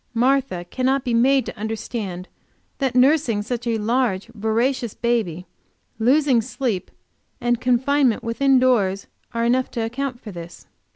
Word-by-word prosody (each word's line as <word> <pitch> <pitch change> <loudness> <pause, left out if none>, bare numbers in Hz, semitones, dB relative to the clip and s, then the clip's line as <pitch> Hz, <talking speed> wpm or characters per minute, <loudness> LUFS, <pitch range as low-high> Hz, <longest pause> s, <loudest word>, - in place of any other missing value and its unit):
Martha 245 -8 +1
cannot 260 +1 +1
be 245 -3 -1
made 260 +2 +3
to - - -6
understand 210 -3 -5 0.5
that 265 -3 -1
nursing 255 -5 +3
such 240 +2 -4
a 230 -1 +1
large, 220 -3 0
voracious 230 +2 -1
baby, 215 -8 -1 0.5
losing 260 +1 +3
sleep, 225 -4 -3 0.5
and 240 -1 0
confinement 255 0 +2
within 265 +4 +2
doors, 210 -7 +2 0.3
are 230 0 +1
enough 255 +2 +2
to 230 -1 -2
account 250 +2 -4
for 215 - -9
this. 170 -1 -10
240 Hz, 135 wpm, -22 LUFS, 220-260 Hz, 0.5 s, made